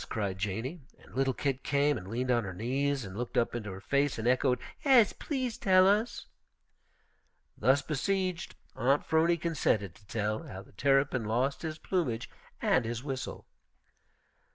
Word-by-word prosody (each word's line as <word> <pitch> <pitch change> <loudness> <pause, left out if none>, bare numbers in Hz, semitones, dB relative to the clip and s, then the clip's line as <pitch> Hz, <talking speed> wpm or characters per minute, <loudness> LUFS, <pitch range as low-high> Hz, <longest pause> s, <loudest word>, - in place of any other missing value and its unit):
cried 100 -4 -2
Janey, 115 - -3 0.2
and - - -19
little 135 0 +1
Kit 135 0 -2
came 145 +1 +2
and 95 -6 -7
leaned 125 +4 -1
on 120 -1 +2
her 95 -2 -6
knees 135 +4 -1
and 95 0 -8
looked 120 +2 -4
up 115 - +2
into 110 -4 -4
her 95 - -7
face 140 +6 +1
and 110 +1 -2
echoed, 125 0 +3 0.3
"'Es, 255 -8 +6
please 260 -6 -3
to - - -15
tell 185 -1 +6
us." 210 +4 +1 1.3
Thus 135 +5 +3
besieged, 185 +4 -1 0.2
Aunt 135 +4 +2
'Phrony 165 +2 +3
consented 125 - 0
to 105 - -22
tell 110 0 -1
how 95 +1 -9
the - - -20
Terrapin 135 +1 +2
lost 125 +6 0
his 155 -2 -4
plumage 150 -12 -2 0.3
and 130 - +3
his 115 +2 -4
whistle. 135 -3 -5
130 Hz, 165 wpm, -30 LUFS, 115-155 Hz, 1.3 s, Es